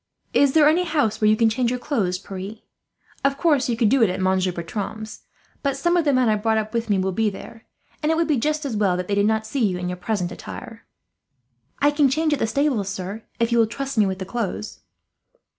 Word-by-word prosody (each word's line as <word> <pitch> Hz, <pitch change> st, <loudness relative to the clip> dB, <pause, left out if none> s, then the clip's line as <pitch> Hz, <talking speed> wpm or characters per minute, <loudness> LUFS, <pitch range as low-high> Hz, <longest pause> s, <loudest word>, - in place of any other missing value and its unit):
"Is 280 Hz, -2 st, +4 dB
there 305 Hz, -2 st, +6 dB
any 330 Hz, +4 st, +3 dB
house 285 Hz, -11 st, 0 dB
where 215 Hz, -, +5 dB
you 215 Hz, -, +4 dB
can 230 Hz, -, +4 dB
change 235 Hz, +2 st, +1 dB
your 250 Hz, -, -1 dB
clothes, 215 Hz, -9 st, -1 dB
Pierre? 195 Hz, +2 st, -7 dB, 0.7 s
Of 275 Hz, 0 st, +1 dB
course 290 Hz, -7 st, +2 dB
you 235 Hz, -, 0 dB
could 225 Hz, -3 st, +3 dB
do 260 Hz, 0 st, +4 dB
so 215 Hz, -, +4 dB
at 185 Hz, -, -4 dB
Monsieur 185 Hz, 0 st, +1 dB
Bertram's, 205 Hz, +5 st, -6 dB, 0.4 s
but 275 Hz, -1 st, -1 dB
some 345 Hz, +5 st, +1 dB
of 340 Hz, -2 st, +2 dB
the 290 Hz, -, +4 dB
men 255 Hz, -2 st, +3 dB
I 215 Hz, -, +3 dB
brought 220 Hz, 0 st, 0 dB
with 230 Hz, -1 st, -2 dB
me 200 Hz, -, +3 dB
will 190 Hz, 0 st, 0 dB
be 215 Hz, +3 st, +1 dB
there, 225 Hz, +3 st, -11 dB, 0.4 s
and 305 Hz, +1 st, +1 dB
it -, -, +2 dB
would 335 Hz, 0 st, +1 dB
be 300 Hz, -4 st, +2 dB
just 300 Hz, +5 st, -1 dB
as 255 Hz, -5 st, -2 dB
well 195 Hz, -4 st, +2 dB
that 180 Hz, 0 st, -4 dB
they 205 Hz, -, -1 dB
did 200 Hz, +1 st, +3 dB
not 220 Hz, 0 st, +1 dB
see 250 Hz, +3 st, -1 dB
you 190 Hz, -4 st, +1 dB
in 180 Hz, 0 st, -3 dB
your 180 Hz, -, -4 dB
present 180 Hz, -2 st, -2 dB
attire." 100 Hz, -, -9 dB, 0.9 s
"I 290 Hz, +1 st, +3 dB
can 290 Hz, -2 st, +3 dB
change 310 Hz, +3 st, +1 dB
at 295 Hz, -, -1 dB
the -, -, +1 dB
stables, 240 Hz, -5 st, 0 dB
sir, 195 Hz, +2 st, -5 dB, 0.2 s
if 230 Hz, 0 st, +1 dB
you 235 Hz, -, +3 dB
will 225 Hz, -, +4 dB
trust 270 Hz, +4 st, -5 dB
me 215 Hz, -3 st, +4 dB
with 190 Hz, -1 st, -2 dB
the 190 Hz, -, -5 dB
clothes." 215 Hz, -1 st, -4 dB
225 Hz, 245 wpm, -23 LUFS, 200-275 Hz, 0.9 s, there